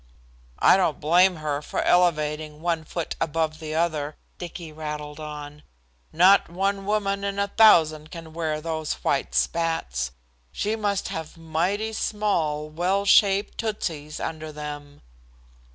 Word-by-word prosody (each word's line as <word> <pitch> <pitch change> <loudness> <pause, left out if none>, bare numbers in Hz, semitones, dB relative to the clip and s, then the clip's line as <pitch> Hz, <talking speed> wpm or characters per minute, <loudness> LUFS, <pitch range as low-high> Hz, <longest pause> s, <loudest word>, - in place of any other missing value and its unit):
"I - - +6
don't 170 -6 +1
blame 180 +4 +4
her 150 -2 -3
for - - -3
elevating 155 -3 +1
one 165 -1 -1
foot 170 +1 -4
above 160 0 -1
the 155 -1 -5
other," 155 -3 -1 0.2
Dicky 170 -2 -7
rattled 150 -1 -6
on. 150 -1 -8 0.5
"Not 185 +4 +5
one 195 +2 -1
woman 200 -1 0
in 200 0 -2
a 200 0 0
thousand 155 -8 +5
can 165 -2 -10
wear 160 -2 -2
those 160 -1 -2
white 140 - 0
spats. 165 - 0 0.4
She 215 +2 -1
must 205 -3 -1
have 160 0 -6
mighty 175 +7 -1
small, 170 -9 -1
well 180 +6 0
shaped 200 0 +4
tootsies 160 -9 -3
under 155 -1 -5
them." 145 -1 -8
160 Hz, 135 wpm, -25 LUFS, 150-190 Hz, 0.5 s, I